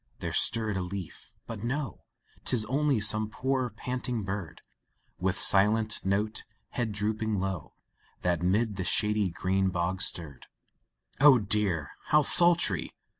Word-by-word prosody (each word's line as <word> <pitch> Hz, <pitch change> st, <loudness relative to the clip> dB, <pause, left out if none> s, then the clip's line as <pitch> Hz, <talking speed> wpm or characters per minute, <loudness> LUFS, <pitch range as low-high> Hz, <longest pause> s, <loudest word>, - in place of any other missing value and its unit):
there -, -, -6 dB
stirred 110 Hz, -2 st, +1 dB
a -, -, -3 dB
leaf, 90 Hz, -1 st, -9 dB
but 110 Hz, -2 st, -9 dB
no, 135 Hz, -1 st, -4 dB, 0.4 s
Tis 115 Hz, -4 st, 0 dB
only 140 Hz, +1 st, 0 dB
some 110 Hz, 0 st, +3 dB
poor, 130 Hz, +2 st, -2 dB
panting 125 Hz, +1 st, -5 dB
bird, 95 Hz, -4 st, -7 dB, 0.6 s
With 95 Hz, +1 st, -1 dB
silenced 105 Hz, +1 st, +4 dB
note, 105 Hz, +3 st, -2 dB, 0.3 s
head 120 Hz, -3 st, -4 dB
drooping 110 Hz, +1 st, -3 dB
low, 95 Hz, -4 st, -5 dB, 0.5 s
That 85 Hz, -2 st, -1 dB
'mid 100 Hz, +3 st, -1 dB
the 95 Hz, -, -3 dB
shady 105 Hz, 0 st, 0 dB
green 95 Hz, +2 st, -1 dB
boughs 90 Hz, +1 st, -1 dB
stirred. 75 Hz, -7 st, -3 dB, 0.7 s
Oh 140 Hz, -1 st, +6 dB
dear! 100 Hz, -8 st, -1 dB
how 150 Hz, 0 st, +2 dB
sultry! 170 Hz, -, +6 dB
105 Hz, 130 wpm, -27 LUFS, 95-115 Hz, 0.7 s, Oh